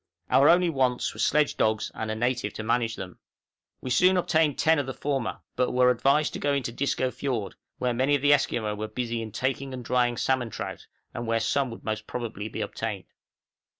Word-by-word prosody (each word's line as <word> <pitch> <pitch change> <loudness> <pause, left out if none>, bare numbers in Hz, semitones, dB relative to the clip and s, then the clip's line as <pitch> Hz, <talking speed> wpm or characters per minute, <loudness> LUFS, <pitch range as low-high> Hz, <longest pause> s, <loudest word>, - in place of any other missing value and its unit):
Our 140 +2 +6
only 175 0 +5
wants 130 -4 0
were - - -12
sledge 150 0 +2
dogs 110 0 +1
and 110 - -4
a 110 - -1
native 120 -2 -1
to 110 - -6
manage 115 0 0
them. 90 -1 -8 0.6
We 130 - -4
soon 185 +8 +5
obtained 160 -4 +2
ten 160 -1 +3
of 140 - -2
the 130 - -5
former, 135 -4 -2
but 125 - 0
were 125 0 +5
advised 140 +5 +2
to - - -4
go 145 0 +1
into 135 -4 -1
Disco 130 0 -1
Fiord, 120 -9 -3 0.2
where 125 -1 0
many 130 +4 +2
of 140 - -2
the 145 0 +6
Esquimaux 115 -6 0
were 105 +1 -4
busy 115 +1 -3
in 110 -1 -6
taking 130 +3 -2
and 125 -2 -8
drying 120 -1 +1
salmon 130 -3 0
trout, - - -6 0.3
and 120 0 -5
where 115 0 +2
some 125 +5 0
would 115 - -9
most 110 -1 -3
probably 110 -4 -4
be - - -5
obtained. - - -4
125 Hz, 210 wpm, -27 LUFS, 115-140 Hz, 0.6 s, Our